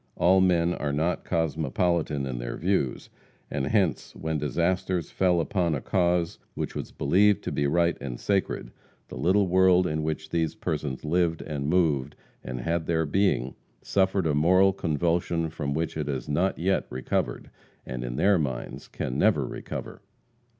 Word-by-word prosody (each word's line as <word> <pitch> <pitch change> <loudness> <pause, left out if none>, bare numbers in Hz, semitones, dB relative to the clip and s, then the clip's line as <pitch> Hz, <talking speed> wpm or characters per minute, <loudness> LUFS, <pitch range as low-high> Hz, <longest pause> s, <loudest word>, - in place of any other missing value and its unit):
All 95 +2 +4
men 90 -2 +3
are 75 -4 -2
not 80 +5 0
cosmopolitan 80 -2 0
in 65 -2 -4
their - - -4
views, 85 -8 -1 0.4
and 70 -2 -1
hence, 100 -7 0
when 80 -1 -2
disasters 85 +4 -1
fell 90 -2 +2
upon 85 -2 0
a - - -2
cause 85 +2 0 0.2
which - - -3
was - - -5
believed 100 +1 +3
to - - -3
be 70 - 0
right 85 +2 +2
and 65 -4 -5
sacred, 95 -11 -1 0.4
the - - -8
little 95 +3 +3
world 90 0 +4
in 80 -3 -1
which 80 0 -3
these 80 -2 0
persons 75 -2 -3
lived 85 0 +1
and 70 -2 -3
moved 75 -6 +1 0.3
and 60 0 -5
had 85 +3 -1
their 80 -1 +1
being, 75 -6 +1 0.3
suffered 95 -1 +1
a 80 - +2
moral 95 +6 +4
convulsion 85 -1 0
from 75 -3 -3
which 80 +1 -2
it 75 -2 -3
has 65 -4 -3
not 90 +6 0
yet 95 +4 0
recovered, 65 +1 -2 0.3
and, 65 -1 -5
in - - -4
their 100 +5 +3
minds, 65 -5 -4
can 60 - -4
never - - +3
recover. - - -7
80 Hz, 165 wpm, -26 LUFS, 75-90 Hz, 0.4 s, All